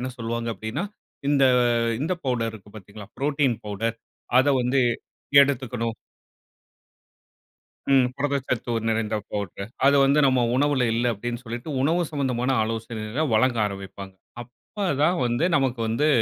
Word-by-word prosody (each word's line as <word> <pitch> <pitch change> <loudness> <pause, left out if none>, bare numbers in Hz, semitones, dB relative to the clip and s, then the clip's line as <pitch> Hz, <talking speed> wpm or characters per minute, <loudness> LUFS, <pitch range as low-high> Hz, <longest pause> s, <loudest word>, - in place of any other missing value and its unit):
என்ன 130 +1 -3
சொல்வாங்க 115 0 -3
அப்டினா, 110 - -4 0.4
இந்த 140 -2 +3 0.6
இந்த 160 +6 0
பவுடருக்கு 115 -5 -3
பாத்தீங்களா 100 0 -11
புரோட்டீன் 140 -4 +1
பவுடர் 115 +3 -2 0.4
அத 130 - +4 0.2
வந்து 130 +2 +2 0.6
எடுத்துக்கணும். 125 -4 -2 1.9
ம். 130 -2 +5
புரதச்சத்து 135 -4 -1 0.2
நிறைந்த 110 -1 0
பவுடர் 100 +1 -5 0.2
அத 140 - +6
வந்து 140 +2 +3
நம்ம 130 -2 +3
உணவுல 145 -3 +2
இல்ல 120 +1 +1
அப்டின்னு 120 +4 -5
சொல்லிட்டு 120 +5 -6
உணவு 170 +5 +2
சம்பந்தமான 130 -3 -1
ஆலோசனைகளை 115 +4 -3
வழங்க 120 +2 +3
ஆரம்பிப்பாங்க. 95 -1 -8 0.3
அப்ப 195 - -7 0.2
தான் 175 +4 +3
வந்து 120 +7 0
நமக்கு 130 -4 0
வந்து 140 +7 +1
120 Hz, 120 wpm, -24 LUFS, 110-135 Hz, 1.9 s, அத